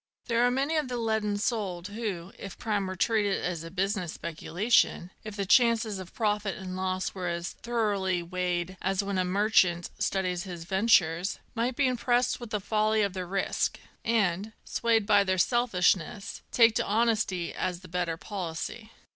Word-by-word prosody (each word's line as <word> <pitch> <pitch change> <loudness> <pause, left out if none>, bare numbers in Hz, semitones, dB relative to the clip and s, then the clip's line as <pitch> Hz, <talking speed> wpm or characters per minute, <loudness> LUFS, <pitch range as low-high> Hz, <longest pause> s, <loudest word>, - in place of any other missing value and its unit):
There 235 0 +2
are 245 - +5
many 275 +5 0
of 300 -3 0
the 250 -1 -3
leaden 220 -3 0
souled 205 -5 -2
who, 200 -5 -4
if 195 -2 -8
crime 205 -4 -1
were 185 - -4
treated 205 0 +1
as 175 -2 -2
a 165 - -7
business 190 -1 -1
speculation, 175 +2 +1
— - - -37
if 215 -1 -7
the 200 -1 -2
chances 230 -2 +3
of 185 -2 -10
profit 210 -2 0
and 185 -1 -6
loss 185 0 -2
were 185 -2 -4
as 170 0 -3
thoroughly 205 -6 -1
weighed 180 +1 -2
as 195 +1 0
when 200 -1 -1
a - - +3
merchant 185 -2 +2
studies 185 -4 0
his 175 -2 -7
ventures, 185 -2 +2
— - - -35
might 240 +2 -1
be 280 - +2
impressed 245 -1 +1
with 240 -2 -8
the 210 -1 -1
folly 215 +1 +1
of 200 -2 -1
the 185 -2 -4
risk, 195 +2 -1 0.2
and, 210 -2 +1
swayed 225 -2 +1
by 205 0 +5
their 185 -1 0
selfishness, 195 -4 +1
take 230 -2 +5
to - - +1
honesty 210 -5 +1
as 180 -1 -3
the 185 - -12
better 175 -1 -2
policy. 195 +4 -5
200 Hz, 180 wpm, -28 LUFS, 180-225 Hz, 0.2 s, are